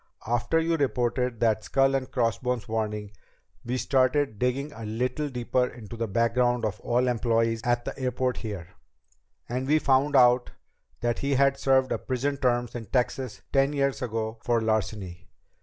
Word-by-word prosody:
After 120 +7 +1
you 165 0 +1
reported 125 -3 0
that 110 -2 +2
skull 135 +3 +2
and 135 -1 -1
crossbones 125 -1 -1
warning, 105 -2 -3 0.5
we 125 +2 -2
started 130 -3 +1
digging 135 +4 -1
a 115 - -9
little 125 +7 -2
deeper 125 0 0
into 115 -2 -10
the 115 0 -2
background 115 +2 +1
of 105 0 -3
all 125 +2 +1
employees 115 -1 +1
at 120 0 0
the - - -4
airport 125 -1 -1
here. 100 -7 -6 0.8
And 130 +2 -3
we 150 +2 +4
found 140 0 +2
out 125 -1 +5 0.5
that 120 -1 0
he 140 0 0
had 135 +1 +4
served 130 -1 +3
a - - 0
prison 140 +2 -2
term 120 -2 +1
in 115 -3 -6
Texas 125 +1 -1
ten 135 +1 +3
years 140 -1 0
ago 110 -2 -3
for 120 -1 +2
larceny. 105 -5 -2
125 Hz, 160 wpm, -27 LUFS, 115-130 Hz, 0.8 s, out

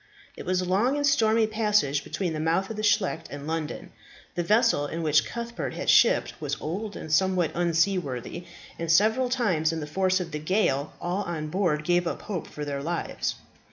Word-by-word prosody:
It - - -9
was 185 0 +1
a - - -2
long 210 +9 +2
and 290 - +1
stormy 225 -5 +3
passage 210 -10 +1
between 180 -4 -3
the 155 - -3
mouth 165 +6 0
of - - -5
the 215 - -4
Scheldt 190 -6 +1
and 145 0 -7
London. 160 -1 -4 0.4
The 175 - -1
vessel 210 - +3
in 165 +3 -4
which 155 -1 +3
Cuthbert 235 0 -5
had - - +1
shipped - - +4
was - - -3
old 200 +7 -4
and 155 - -5
somewhat 185 -1 +2
unseaworthy, 170 -3 0 0.3
and 165 -1 -1
several 220 +8 +3
times 185 -11 +1
in 165 - -3
the 150 - -4
force 185 +4 +1
of 175 -2 -5
the 150 - -3
gale 155 -4 0
all 180 +3 -2
on 155 -3 -4
board 165 -4 0
gave 175 +1 +2
up - - -4
hope 190 -6 -4
for 150 - -6
their 140 -1 -3
lives. 170 +3 -2
175 Hz, 195 wpm, -26 LUFS, 155-210 Hz, 0.4 s, shipped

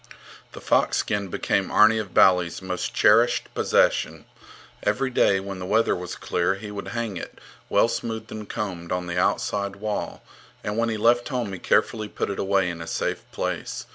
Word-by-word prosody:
* - - -20
The - - -9
fox - - +2
skin 100 -1 -1
became - - -1
Arni 110 +1 +5
of 100 -4 -5
Bali's 90 -3 +4
most 90 -1 -4
cherished - - +3
possession. - - +1 0.6
Every 135 0 0
day, 100 -5 +3
when 95 -1 -6
the 90 - -5
weather 110 +3 +2
was 90 -1 -6
clear, 90 +2 0
he 105 +1 -8
would 100 -1 -6
hang 115 -5 -3
it, - - -8 0.3
well - - +4
smoothed 110 -1 -4
and 105 -1 -7
combed, 90 -5 -5
on 90 0 -1
the 85 0 -2
outside 100 +1 0
wall, 105 +1 -4 0.4
and 105 - -3
when 115 +1 +1
he 110 - -2
left 120 +4 +3
home 120 -7 -2
he 95 - -6
carefully 110 +4 +1
put - - -3
it 100 - -5
away 95 -1 +2
in 85 -1 -8
a 85 - -7
safe - - -2
place. - - -4
100 Hz, 190 wpm, -24 LUFS, 90-110 Hz, 0.6 s, Arni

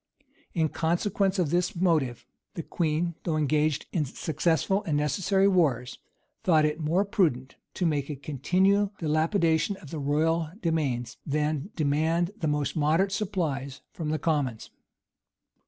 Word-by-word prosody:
In 160 -2 +2
consequence 190 +5 0
of 170 -5 0
this 180 +3 +1
motive, 160 -9 +1 0.3
the 165 - -4
queen, 170 +1 -1
though 160 -2 0
engaged 150 0 +1
in 165 - +1
successful 160 +6 0
and 150 -3 0
necessary 190 +7 +2
wars, 145 -11 +1 0.4
thought 160 -4 +4
it 150 +1 -1
more 165 +6 +1
prudent 145 -10 0 0.2
to 180 - -1
make 145 -3 0
a 150 - -3
continual 185 - +1
dilapidation 160 +3 +1
of 150 - -13
the 160 - -4
royal 155 +3 +1
demesnes,[*] 145 - -1
than 150 +2 -1
demand 160 +4 +1
the 160 - -1
most 150 -2 -1
moderate 160 +6 +2
supplies 155 - -2
from 160 -4 -4
the 155 - 0
commons. 140 -7 -1
160 Hz, 140 wpm, -27 LUFS, 150-180 Hz, 0.4 s, thought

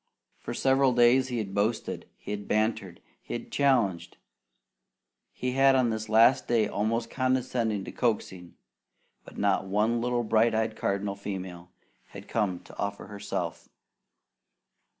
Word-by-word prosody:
For - - -6
several 135 -1 +3
days 120 +2 +4
he 125 -2 -3
had 100 -4 -4
boasted, 105 +3 -2
he - - -8
had 105 -1 -5
bantered, 105 -4 -1 0.2
he - - -6
had - - -7
challenged, 120 -11 +1 1.1
he 125 - -3
had 135 +1 +4
on 125 -3 +2
this 110 0 -4
last 115 +4 +5
day 115 -3 +2
almost 115 +3 -1
condescended 125 -5 0
to - - -7
coaxing, 95 -7 -2 0.7
but - - -14
not 100 -1 +1
one 110 +4 +1
little 120 0 0
bright 110 +1 +2
eyed 110 0 0
cardinal 100 0 -2
female 95 -3 -7 0.4
had - - -11
come 100 -6 -1
to - - -15
offer 100 0 -3
herself. 100 0 -5
110 Hz, 140 wpm, -28 LUFS, 100-120 Hz, 1.1 s, last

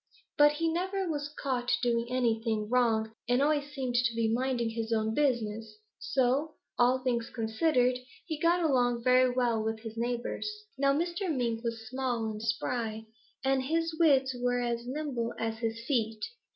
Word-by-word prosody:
But 295 0 +6
he 330 +2 -1
never 375 +2 -1
was 295 -3 -2
caught 260 -4 -1
doing 235 -1 +1
anything 225 -3 0
wrong 225 -3 +2 0.2
and 245 +1 +3
always 290 0 +1
seemed 265 -4 -3
to 240 -1 +2
be 230 -1 +1
minding 245 -2 0
his 225 0 -4
own 220 -1 +1
business, 225 -6 -1 0.2
so, 270 +4 0 0.2
all 255 +1 +3
things 235 -3 0
considered, 250 +2 +1 0.3
he 315 -3 -4
got 340 +1 +3
along 245 -5 +2
very 255 0 +5
well 240 -3 +1
with 220 0 -2
his 225 -1 -7
neighbors. 240 - -2 0.3
"Now 275 0 +3
Mr. 345 +5 -1
Mink 235 -5 -1
was 230 -1 -4
small 250 -2 -2
and 215 0 -7
spry, 225 0 -2 0.4
and 270 0 +3
his 330 +4 -1
wits 270 -5 +4
were 245 0 +1
as 235 0 -2
nimble 255 -4 -3
as 225 0 -3
his 230 0 -3
feet. 225 -5 0
245 Hz, 165 wpm, -30 LUFS, 230-275 Hz, 0.4 s, But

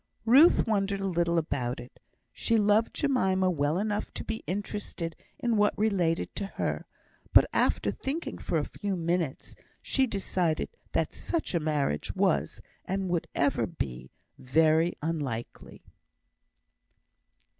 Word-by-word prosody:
Ruth 275 +9 +6
wondered 200 -2 0
a 195 - -2
little 170 -1 +1
about 130 -7 -1
it. 120 +1 -12 0.3
She 230 - +1
loved 210 +1 +3
Jemima 190 -10 +2
well 150 0 0
enough 210 +1 -2
to - - -4
be 225 - -4
interested 190 -3 -4 0.2
in 235 -2 0
what 210 0 +3
related 185 -6 +1
to 200 - -2
her; - - -3 0.5
but, - - +8
after - - +2
thinking 300 +6 -4
for 165 - -1
a 150 - 0
few 200 -2 -3
minutes, 170 -4 -2 0.3
she 265 -1 +1
decided 185 -6 -1 0.2
that - - 0
such 335 - -3
a 170 - +2
marriage 150 - -1
was, - - +1 0.2
and 190 0 -2
would 175 -2 -1
ever 140 0 +1
be, 65 - -5 0.3
very 160 +5 +3
unlikely. 145 -8 -4
180 Hz, 135 wpm, -28 LUFS, 155-205 Hz, 0.5 s, but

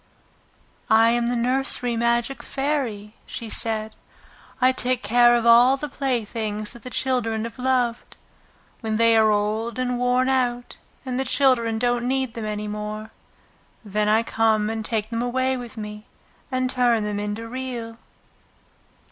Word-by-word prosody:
"I 225 +1 +5
am 235 0 +1
the 245 - 0
nursery 250 0 +1
magic 235 +3 0
Fairy," 255 -8 -3
she 225 -2 -6
said. 220 -1 0 0.7
"I 255 0 +5
take 255 -1 0
care 240 +1 +5
of 235 -1 0
all 240 +3 +6
the 295 - -4
playthings 225 -6 -2
that 240 - -13
the 255 - -8
children 230 -3 -1
have 230 +1 -7
loved. 250 -2 -1 0.6
When 220 -2 -2
they 230 0 +4
are 220 -1 +5
old 215 +3 -1
and 250 -1 -1
worn 250 +1 +2
out 245 -2 -1 0.3
and 255 -1 -2
the - - +1
children 250 -5 +2
don't 240 +1 0
need 260 -2 -1
them 230 -2 -5
any 210 0 -4
more, 210 +1 -5 0.7
then 210 +1 0
I 220 +2 +3
come 220 -2 +1
and 220 0 -4
take 220 0 -2
them 230 0 -1
away 260 +2 0
with 240 -3 -8
me 210 0 -7 0.4
and 255 0 0
turn 245 -3 +2
them 210 -1 -3
into 210 +2 -4
Real." 240 -2 -6
235 Hz, 155 wpm, -23 LUFS, 220-250 Hz, 0.7 s, all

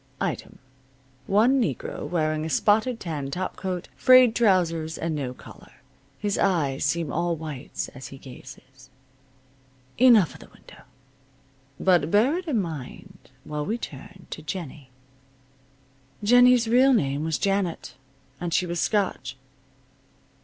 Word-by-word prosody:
Item: - - -4 0.7
One 240 +7 +3
negro 145 - -3
wearing 155 -2 0
a 160 - -3
spotted 220 +7 +2
tan 150 -6 -4
topcoat, 185 +2 -4
frayed 255 -2 +6
trousers 170 -7 +1
and 165 0 -2
no 140 -4 -3
collar. 125 - -14 0.4
His 205 -1 -2
eyes 150 -8 +1
seem 155 -1 -1
all 170 +1 0
whites 150 -4 -6
as 130 -1 -10
he 135 - -11
gazes. 130 0 -14 1.1
Enough 235 -9 +6
of - - -14
the - - -14
window. - - -17 1.0
But 175 -5 +3
bear 225 - +3
it 365 - -10
in 260 -8 +1
mind 155 -8 -8
while 150 0 -4
we 220 +9 -2
turn 180 - -10
to - - -6
Jennie. 150 -4 -7 1.3
Jennie's 245 +1 +5
real 255 +4 +5
name 140 - 0
was 160 -1 -1
Janet, 195 -4 -1 0.5
and 175 -2 -2
she 180 - +2
was 175 -1 -3
Scotch. 200 -10 -1
170 Hz, 130 wpm, -25 LUFS, 150-210 Hz, 1.3 s, frayed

